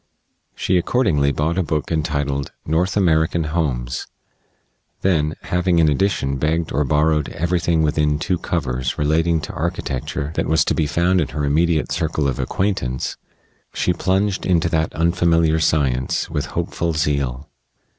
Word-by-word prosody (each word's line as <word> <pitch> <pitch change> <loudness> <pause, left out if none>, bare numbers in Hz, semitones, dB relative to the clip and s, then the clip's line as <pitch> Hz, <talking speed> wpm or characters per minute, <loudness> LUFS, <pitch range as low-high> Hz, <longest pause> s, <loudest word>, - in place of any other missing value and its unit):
She 90 -1 +1
accordingly 85 - +2
bought 80 +6 0
a - - +3
book 75 -1 -2
entitled 70 -3 -1
"North 85 +6 0
American 80 -3 +2
Homes"; 70 -6 -2 0.9
then, 80 -4 +1
having, 90 0 +1
in 80 -2 +4
addition, 70 -4 0
begged 80 +4 0
or 75 +3 +1
borrowed 75 +1 +1
everything 85 -1 0
within 75 -1 +1
two 90 +3 -1
covers 65 -6 -2
relating 80 +3 +2
to - - -7
architecture 70 +2 -3
that - - -1
was 80 -2 +3
to - - +1
be 75 - 0
found 90 +4 +2
in 75 - 0
her 75 -2 -3
immediate 80 +2 +1
circle 80 -3 0
of 65 -3 -2
acquaintance, 65 -11 -1 0.6
she 90 - +1
plunged 95 +3 0
into 85 -2 +2
that 80 -1 0
unfamiliar 85 -1 +2
science 65 -5 0
with - - -2
hopeful 85 -1 -2
zeal. 70 -3 -1
80 Hz, 145 wpm, -20 LUFS, 70-85 Hz, 0.9 s, in